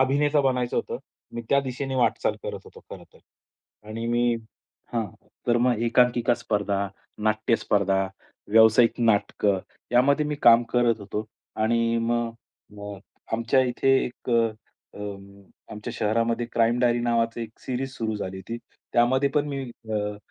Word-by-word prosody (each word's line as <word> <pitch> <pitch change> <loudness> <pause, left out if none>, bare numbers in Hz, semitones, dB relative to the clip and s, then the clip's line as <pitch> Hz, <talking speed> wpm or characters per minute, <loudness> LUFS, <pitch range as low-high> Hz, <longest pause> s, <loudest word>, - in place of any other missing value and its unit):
अभिनेता 145 +3 +3
बनायचं 125 -3 0
होतं. - - -2 0.4
मी 120 - -4
त्या 140 - +4
दिशेने 135 0 -4
वाटचाल 125 - +1
करत - - -5
होतो - - -14
खरंतर. - - -12 0.7
आणि 115 +2 -4
मी 120 0 +2 0.6
हां. 115 -2 0 0.4
तर 120 - +3
मग 120 -1 +2
एकांकिका 120 0 +3
स्पर्धा, 100 -3 -1 0.3
नाट्य 110 +2 +1
स्पर्धा, 95 -2 +1 0.4
व्यावसायिक 110 +2 +6
नाटकं 105 -3 +2 0.3
यामध्ये 140 +5 +4
मी 150 - -1
काम 120 0 +8
करत 120 -2 +2
होतो. 105 +2 -4 0.3
आणि 115 +1 +1
मग 115 0 0 0.5
अ, 100 -1 -7 0.3
आमच्या 115 +4 +2
इथे 130 +1 +1
एक 125 - -7
अ, 115 -3 -2 0.7
आमच्या 105 -1 -6
शहरामध्ये 115 +2 0
क्राईम 115 +1 +2
डायरी 120 -1 +3
नावाची 115 -1 0
एक 110 -1 -10
सिरीज 130 +1 -3
सुरू 110 -4 -2
झाली 95 -2 -5
होती. 100 +5 -6 0.4
त्यामध्ये 130 +4 +3
पण 150 0 +2
मी 140 -1 -3 0.3
अ, 105 -1 -1
115 Hz, 140 wpm, -25 LUFS, 110-125 Hz, 0.7 s, काम